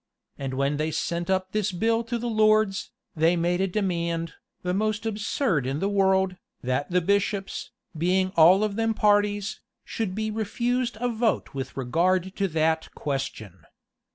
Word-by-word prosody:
And 135 Hz, -1 st, -4 dB
when 140 Hz, +2 st, 0 dB
they 155 Hz, +1 st, 0 dB
sent 170 Hz, +2 st, -2 dB
up 185 Hz, 0 st, 0 dB
this 210 Hz, -1 st, 0 dB
bill 225 Hz, +5 st, +1 dB
to 235 Hz, +1 st, -2 dB
the 235 Hz, -, -5 dB
lords, 215 Hz, -3 st, +2 dB, 0.3 s
they 165 Hz, +2 st, +3 dB
made 175 Hz, +2 st, +1 dB
a 195 Hz, -, +2 dB
demand, 170 Hz, -4 st, -1 dB, 0.3 s
the 180 Hz, 0 st, -1 dB
most 215 Hz, +2 st, -1 dB
absurd 205 Hz, -, 0 dB
in 135 Hz, +2 st, -1 dB
the 195 Hz, -, 0 dB
world, 190 Hz, -2 st, +2 dB, 0.3 s
that 130 Hz, +3 st, -1 dB
the 180 Hz, 0 st, +2 dB
bishops, 200 Hz, +1 st, -1 dB, 0.3 s
being 185 Hz, +3 st, +1 dB
all 180 Hz, +5 st, +7 dB
of 210 Hz, -1 st, -1 dB
them 225 Hz, -1 st, +1 dB
parties, 205 Hz, -1 st, +2 dB, 0.3 s
should 205 Hz, -5 st, -3 dB
be 220 Hz, 0 st, -2 dB
refused 235 Hz, +3 st, -1 dB
a 245 Hz, -, 0 dB
vote 230 Hz, -1 st, 0 dB
with 135 Hz, 0 st, -5 dB
regard 180 Hz, +8 st, +1 dB
to 200 Hz, -, +1 dB
that 160 Hz, -1 st, 0 dB
question. 125 Hz, -, -4 dB
190 Hz, 160 wpm, -26 LUFS, 165-215 Hz, 0.3 s, all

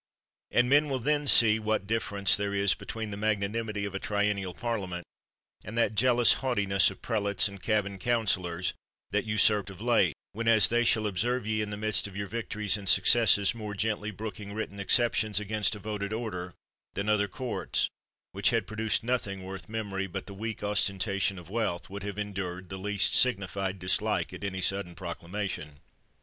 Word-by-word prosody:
And 120 Hz, 0 st, +3 dB
men 145 Hz, +3 st, +4 dB
will 135 Hz, -, 0 dB
then 145 Hz, +3 st, 0 dB
see 110 Hz, -4 st, +7 dB
what 110 Hz, -2 st, -1 dB
difference 100 Hz, -3 st, +2 dB
there 100 Hz, 0 st, -2 dB
is 100 Hz, -1 st, +3 dB
between 110 Hz, -2 st, -6 dB
the 100 Hz, -, -5 dB
magnanimity 105 Hz, 0 st, -1 dB
of 100 Hz, -, -5 dB
a 95 Hz, -, -3 dB
triennial 100 Hz, -3 st, -1 dB
parliament, 95 Hz, -8 st, -4 dB, 0.6 s
and 105 Hz, +3 st, -7 dB
that 115 Hz, -2 st, +2 dB
jealous 120 Hz, +2 st, +4 dB
haughti 125 Hz, -6 st, 0 dB
ness 95 Hz, -2 st, +4 dB
of 95 Hz, -, -12 dB
prelates 100 Hz, -4 st, +1 dB
and 100 Hz, -2 st, -10 dB
cabin 100 Hz, -1 st, -1 dB
counselors 95 Hz, -7 st, 0 dB, 0.4 s
that -, -, 0 dB
usurped 105 Hz, -2 st, +2 dB
of 95 Hz, -2 st, -11 dB
late, 110 Hz, -8 st, +2 dB, 0.2 s
whenas 115 Hz, -2 st, +5 dB
they 120 Hz, +1 st, +2 dB
shall 110 Hz, -2 st, +2 dB
oserve 120 Hz, +5 st, -1 dB
ye 110 Hz, 0 st, 0 dB
in 105 Hz, -, -3 dB
the 105 Hz, -, -5 dB
midst 110 Hz, 0 st, 0 dB
of 100 Hz, -, -12 dB
your 100 Hz, -, -2 dB
victories 105 Hz, -1 st, -1 dB
and 100 Hz, -2 st, -3 dB
successes 110 Hz, -2 st, +5 dB
more 105 Hz, -3 st, -6 dB
gently 110 Hz, 0 st, -1 dB
brooking 105 Hz, -1 st, -7 dB
written 105 Hz, -2 st, -5 dB
exceptions 110 Hz, -1 st, +2 dB
against 105 Hz, 0 st, 0 dB
a -, -, -9 dB
voted 100 Hz, 0 st, -4 dB
order 90 Hz, -6 st, -5 dB, 0.4 s
than 100 Hz, -, -3 dB
other 105 Hz, -1 st, +2 dB
courts, 120 Hz, +5 st, -1 dB, 0.4 s
which 100 Hz, 0 st, +2 dB
had 115 Hz, -4 st, 0 dB
pro 110 Hz, +3 st, -9 dB
duced 110 Hz, 0 st, 0 dB
nothing 105 Hz, -6 st, -2 dB
worth 95 Hz, +3 st, -8 dB
memory 100 Hz, -3 st, -3 dB
but 95 Hz, +1 st, -6 dB
the 100 Hz, -, -9 dB
weak 110 Hz, +1 st, -5 dB
osten 105 Hz, -1 st, 0 dB
tation 100 Hz, 0 st, 0 dB
of 90 Hz, -, -11 dB
wealth, 100 Hz, -6 st, -2 dB
would 100 Hz, 0 st, -6 dB
have 100 Hz, 0 st, -5 dB
endured 95 Hz, -3 st, -5 dB
the 95 Hz, -, -6 dB
least 100 Hz, -1 st, +1 dB
signified 100 Hz, -5 st, +1 dB
dislike 90 Hz, 0 st, 0 dB
at -, -, -8 dB
any 95 Hz, -2 st, -3 dB
sudden 95 Hz, -2 st, 0 dB
proclamation. 85 Hz, -2 st, -5 dB
105 Hz, 185 wpm, -28 LUFS, 95-110 Hz, 0.6 s, see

